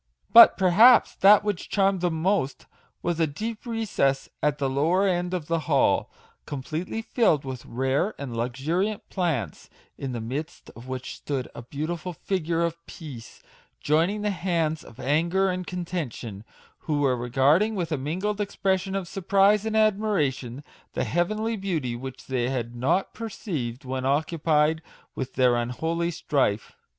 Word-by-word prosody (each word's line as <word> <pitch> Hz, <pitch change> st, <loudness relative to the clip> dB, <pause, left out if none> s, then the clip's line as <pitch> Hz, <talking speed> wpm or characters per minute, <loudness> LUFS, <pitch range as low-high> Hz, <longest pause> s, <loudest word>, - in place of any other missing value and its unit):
But, 235 Hz, -, +10 dB
perhaps, 210 Hz, +7 st, +6 dB
that 200 Hz, +1 st, +7 dB
which 205 Hz, -4 st, -3 dB
charmed 195 Hz, -2 st, +2 dB
them 170 Hz, -3 st, 0 dB
most 180 Hz, -8 st, 0 dB, 0.4 s
was 175 Hz, -1 st, -1 dB
a 165 Hz, -, +3 dB
deep 215 Hz, -, -6 dB
recess 205 Hz, -, 0 dB
at 150 Hz, -1 st, +1 dB
the 140 Hz, -, 0 dB
lower 165 Hz, +9 st, +2 dB
end 180 Hz, -1 st, 0 dB
of 180 Hz, -4 st, -3 dB
the 165 Hz, +1 st, 0 dB
hall, 140 Hz, -3 st, +3 dB, 0.4 s
completely 160 Hz, +10 st, -4 dB
filled 190 Hz, -, +2 dB
with 130 Hz, -2 st, -7 dB
rare 135 Hz, -, 0 dB
and 135 Hz, -4 st, -6 dB
luxuriant 155 Hz, -, -2 dB
plants, 150 Hz, -, -2 dB, 0.3 s
in 135 Hz, -, -4 dB
the 120 Hz, -, -4 dB
midst 130 Hz, +8 st, -6 dB
of 115 Hz, +2 st, -13 dB
which 130 Hz, 0 st, -5 dB
stood 135 Hz, -3 st, -3 dB
a -, -, -8 dB
beautiful 155 Hz, +7 st, -4 dB
figure 170 Hz, -1 st, -2 dB
of 170 Hz, 0 st, -3 dB
Peace, 140 Hz, -9 st, -10 dB, 0.4 s
joining 170 Hz, +8 st, +1 dB
the 210 Hz, -, +1 dB
hands 165 Hz, -4 st, -1 dB
of 115 Hz, -, -15 dB
Anger 170 Hz, +7 st, +1 dB
and 180 Hz, 0 st, -4 dB
Con 180 Hz, -1 st, -4 dB
tention, 120 Hz, -, -5 dB, 0.3 s
who 150 Hz, -2 st, -1 dB
were 135 Hz, -3 st, +3 dB
regarding 140 Hz, -, +2 dB
with 175 Hz, -4 st, -3 dB
a 155 Hz, -, 0 dB
mingled 190 Hz, +9 st, -2 dB
expression 195 Hz, -1 st, -1 dB
of 195 Hz, -3 st, -3 dB
surprise 200 Hz, +3 st, +2 dB
and 220 Hz, 0 st, 0 dB
admiration 175 Hz, -, 0 dB, 0.3 s
the -, -, -1 dB
hea 175 Hz, 0 st, +1 dB
venly 215 Hz, +4 st, -2 dB
beauty 155 Hz, -11 st, -2 dB
which 130 Hz, +2 st, -8 dB
they 125 Hz, -2 st, -1 dB
had 120 Hz, -3 st, -3 dB
not 135 Hz, +11 st, 0 dB
perceived 150 Hz, -, -5 dB
when 130 Hz, 0 st, -3 dB
occupied 155 Hz, +2 st, +1 dB, 0.3 s
with 130 Hz, -1 st, -5 dB
their 125 Hz, -2 st, +4 dB
unholy 160 Hz, +8 st, -1 dB
strife. 135 Hz, -10 st, 0 dB
160 Hz, 155 wpm, -25 LUFS, 135-190 Hz, 0.4 s, But